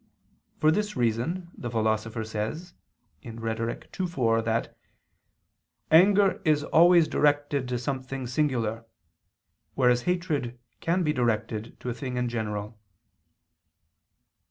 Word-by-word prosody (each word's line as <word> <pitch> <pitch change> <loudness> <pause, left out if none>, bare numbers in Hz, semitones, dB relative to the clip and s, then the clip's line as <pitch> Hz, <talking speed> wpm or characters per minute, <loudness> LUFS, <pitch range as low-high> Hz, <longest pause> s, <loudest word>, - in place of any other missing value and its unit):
For 155 - +4
this 210 +4 -1
reason 125 +10 -1
the 120 - -5
Philosopher 110 0 -1
says 110 - -5 0.5
(Rhet. 115 +2 -5
ii, 185 - +1
4) 115 -9 +1
that 115 +1 -2 1.2
"anger 195 +4 +5
is 150 -2 +2
always 170 0 +5
directed 145 -3 +1
to 125 0 -1
something 130 +1 -4
singular, 120 -4 -1 0.9
whereas 125 -2 +3
hatred 155 -9 -1 0.2
can 175 +2 0
be 150 -2 +1
directed 115 -3 -2
to 125 - -4
a - - -1
thing 125 0 -5
in 125 -1 0
general." 105 -1 -4
125 Hz, 110 wpm, -27 LUFS, 115-155 Hz, 1.2 s, anger